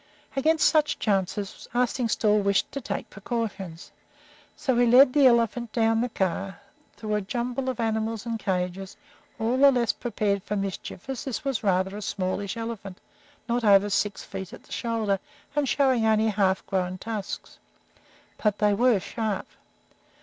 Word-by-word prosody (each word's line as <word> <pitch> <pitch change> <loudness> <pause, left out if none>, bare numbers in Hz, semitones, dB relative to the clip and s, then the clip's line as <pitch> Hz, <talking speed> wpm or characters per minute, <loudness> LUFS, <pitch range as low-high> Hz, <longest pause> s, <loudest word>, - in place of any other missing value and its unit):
Against 310 +3 +3
such 305 -1 +2
chances 200 -1 -2
Arstingstall 230 -3 +2
wished 200 0 +1
to 275 - -5
take - - -5
precautions, 200 -6 -5 0.6
so 260 - 0
he 245 0 +4
led 255 +2 +7
the 285 -3 +6
elephant 235 -1 +2
down 225 -1 +2
the 245 - -1
car, 195 -1 -2 0.4
through 215 -1 -5
the 210 0 +1
jumble 245 +5 -2
of 255 - -4
animals 220 0 -1
and 230 -1 -3
cages, 185 -1 -3 0.4
all 235 +2 0
the 280 0 +8
less 245 -4 +2
prepared 210 -5 -1
for 210 - -4
mischief 195 0 -5
as 265 -3 -4
this 270 +2 -4
was 270 -5 -1
rather 190 0 +1
a 210 - -6
smallish 195 +2 -2
elephant, 225 -5 -6 0.5
not 240 0 0
over 205 -1 +5
six 200 +1 0
feet 190 -2 -7
at - - -11
the - - -21
shoulder 225 -4 -1 0.4
and 290 -3 +1
showing 260 -5 +3
only 220 0 +3
half 195 -2 +1
grown 185 -1 -1
tusks. 210 0 -6 0.8
But 210 -2 +1
they 210 -1 +3
were 235 0 +3
sharp. 215 0 -3
220 Hz, 155 wpm, -26 LUFS, 195-240 Hz, 0.8 s, the